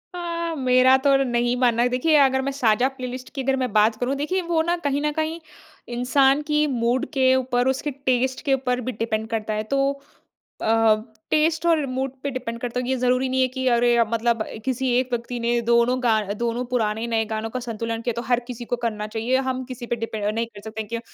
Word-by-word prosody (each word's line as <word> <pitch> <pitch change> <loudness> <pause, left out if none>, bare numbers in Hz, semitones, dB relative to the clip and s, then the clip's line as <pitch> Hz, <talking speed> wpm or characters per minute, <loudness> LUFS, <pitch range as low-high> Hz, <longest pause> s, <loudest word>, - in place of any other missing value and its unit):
अ, 335 -1 -3
मेरा 255 0 +5
तो 280 -1 +5
नहीं 240 -1 0
मानना 240 -2 +3
है। 250 - +2
देखिए, 255 +6 +2
अगर 265 -1 +4
मैं - - 0
साझा 245 -2 +2
प्लेलिस्ट 255 0 -6
की 270 - -2
अगर 270 +1 +1
मैं 255 -3 -1
बात 215 +1 +4
करूँ, 250 +3 0
देखिए, 305 +7 -1
वो 335 -2 0
ना 340 +2 +1
कहीं 280 +1 0
ना 300 0 0
कहीं 315 +1 -2 0.6
इंसान 270 +3 +3
की 300 0 +2
मूड 245 -1 0
के 260 -1 +4
ऊपर, 250 -1 +1
उसके 265 +3 -1
टेस्ट 260 -1 -1
के 275 - +3
ऊपर 250 -1 0
भी - - 0
डिपेंड 220 -1 -2
करता 220 -1 -2
है 215 0 -1
तो 275 0 0 0.6
अ, 225 0 +4 0.4
टेस्ट 320 +2 +2
और 320 -4 +3
मूड 265 +1 -2
पे 280 - -2
डिपेंड 250 -3 -5
करता 245 0 -3
है 250 - -4
कि 255 - -3
ये 265 - +1
ज़रूरी 255 +1 +1
नहीं 260 0 0
है - - +4
कि 260 +1 -4
अरे, 240 0 +3
अब 230 -1 +2
मतलब 230 0 +1
अ, - - -9
किसी 260 0 -1
एक 255 - 0
व्यक्ति 240 +1 -3
ने 235 0 +1
दोनों 235 +2 +3
गा 225 -3 +3
दोनों 235 +3 -2
पुराने, 220 -1 0
नए 225 -1 0
गानों 220 +1 -3
का 255 +2 -4
संतुलन 230 -1 -4
किया, 240 0 -1
तो 235 - -2
हर 245 -1 +1
किसी 240 -1 -6
को - - +3
करना 215 -2 -2
चाहिए। 225 +4 -1
हम 260 0 -2
किसी 250 -1 -8
पे 240 - -1
डिपेंड 225 -2 -4
अ, 210 - +1
नहीं 230 +2 -1
कर 210 -3 -13
सकते 220 0 -6
हैं 210 - -13
क्य 230 0 -3
250 Hz, 235 wpm, -23 LUFS, 230-265 Hz, 0.6 s, मेरा